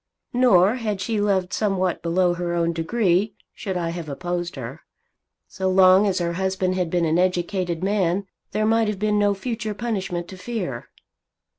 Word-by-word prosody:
Nor, 235 -3 +4
had 215 -5 -2
she 210 +2 -1
loved 190 -3 +1
somewhat 190 -4 0
below 175 +1 +2
her 175 0 -2
own 170 0 +1
degree, 185 +3 +1 0.2
should 190 -2 -4
I 170 -1 -1
have 170 -2 -6
opposed 175 +4 -3
her. 120 -4 -7 0.7
So 190 0 -2
long 185 +2 +6
as 190 -2 0
her 170 -1 -1
husband 190 0 0
had 180 -2 -1
been 175 0 +1
an 160 +2 +2
educated 180 -1 0
man, 195 -1 +1 0.3
there 215 - 0
might 225 0 +3
have 210 -1 -2
been 210 +1 +1
no 205 -1 +3
future 220 0 -4
punishment 190 -7 -3
to 190 - -9
fear." 185 - -5
185 Hz, 170 wpm, -23 LUFS, 175-210 Hz, 0.7 s, long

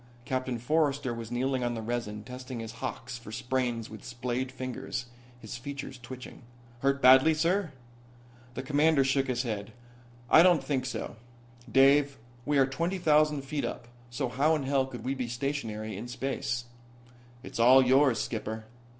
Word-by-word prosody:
Captain 130 -2 -2
Forrester 140 0 +1
was 115 -1 -6
kneeling 130 +1 -1
on 120 0 -1
the 115 - -4
resin 110 -2 -3
testing 125 +1 -7
his 115 -1 -6
hocks 125 -1 -5
for 115 -2 -11
sprains 120 -1 -2
with 110 -2 -11
splayed 125 +1 -3
fingers, 130 0 -5 0.3
his 115 +1 -7
features 140 0 -7
twitching. 125 +2 -10 0.4
"Hurt 140 +1 +1
badly, 130 +5 +7
sir?" 170 +2 +1 0.8
The 130 - -4
Commander 145 +1 +3
shook 135 0 +1
his 125 0 0
head. 110 -3 -4 0.5
"I 155 - +8
don't 175 -2 +5
think 130 -3 -1
so. 125 - -5 0.5
Dave, 140 +1 +5 0.3
we 145 -1 +2
are 135 - +6
twenty 165 +8 -2
thousand 150 -4 +3
feet 145 +2 -3
up, 120 - -5 0.2
so 125 +2 -2
how 145 +6 +2
in 150 - -2
hell 135 -1 +1
could 125 -2 -9
we 130 - 0
be 130 -3 -3
stationary 115 -4 -3
in 110 +5 -6
space?" 125 -1 -3 0.8
"It's - - -7
all 130 +3 +7
yours, 130 -2 +4
skipper." 110 -1 -4
130 Hz, 160 wpm, -29 LUFS, 120-140 Hz, 0.8 s, I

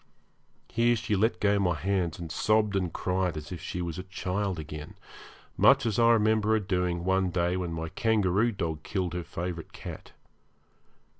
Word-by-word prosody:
Here 120 +1 +3
she 105 -1 -1
let 110 +4 +1
go 100 -1 +3
my 90 -3 +2
hands, 90 +1 -1
and 85 -2 -7
sobbed 105 0 +2
and 90 -3 0
cried 90 -2 -1
as 75 +2 -7
if 90 -3 -6
she 90 0 -4
was 85 0 -4
a - - -5
child 95 0 -2
again, 75 0 -7 0.6
much - - +5
as 110 -1 0
I 115 0 +6
remember 110 -1 +3
her 110 - +3
doing 90 -3 -1
one 95 0 +2
day 90 0 0
when 90 -2 -2
my 80 0 -3
kangaroo 110 +1 +2
dog 80 -6 -3
killed 90 0 -2
her 90 -1 -3
favourite 85 -1 -5
cat. - - -9
95 Hz, 175 wpm, -28 LUFS, 85-105 Hz, 0.6 s, I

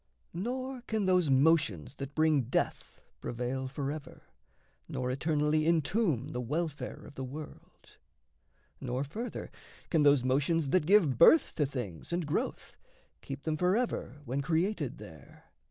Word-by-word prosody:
Nor 255 +7 -3
can 220 -2 0
those 180 -4 +3
motions 135 - +3
that 140 0 -6
bring 155 -4 +3
death 125 - -2 0.2
prevail 125 +2 -3
Forever, 140 +2 -5 0.6
nor 125 0 -2
eternally 150 +2 +1
entomb 170 - +1
The 125 - -3
welfare 150 +4 -3
of - - -12
the 135 - -5
world; 145 +4 -10 0.8
nor, 130 0 -2
further, 220 - -6 0.4
can 160 - +3
Those 145 -3 +5
motions 140 +3 +1
that 180 -5 +2
give 175 - +4
birth 320 - +7
to 145 - +2
things 120 - -6
and 170 -1 -1
growth 165 - -3 0.4
Keep 135 0 -7
them 155 -1 -1
forever 180 - 0
when 135 +3 -1
created 175 +8 0
there. - - -14
150 Hz, 135 wpm, -31 LUFS, 135-170 Hz, 0.8 s, birth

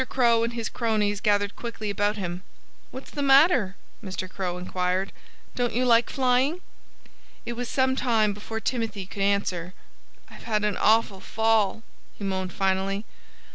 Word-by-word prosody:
Crow 235 -3 +3
and 235 +1 -1
his 230 -2 -3
cronies 210 -3 0
gathered 205 -1 +1
quickly 225 -3 -5
about 205 +1 0
him. 180 -2 -4 0.5
"What's 260 +2 -9
the 290 - -4
matter?" 270 - +5 0.3
Mr. 185 -1 -4
Crow 185 -1 -4
inquired. 180 +1 -1 0.4
"Don't 245 -1 -1
you 255 +1 +2
like 235 -1 +4
flying?" 265 +6 +1 0.8
It 240 - -3
was 245 0 -4
some 260 -1 +2
time 225 -5 +2
before 220 +2 -6
Timothy 225 -5 -2
could 195 +2 -7
answer. 190 -3 0 0.5
"I've - - -13
had 215 -2 0
an 210 -2 0
awful 215 -3 +3
fall," 220 0 +1 0.3
he - - -8
moaned 190 -1 -2
finally. 195 +2 0
210 Hz, 150 wpm, -26 LUFS, 195-235 Hz, 0.8 s, matter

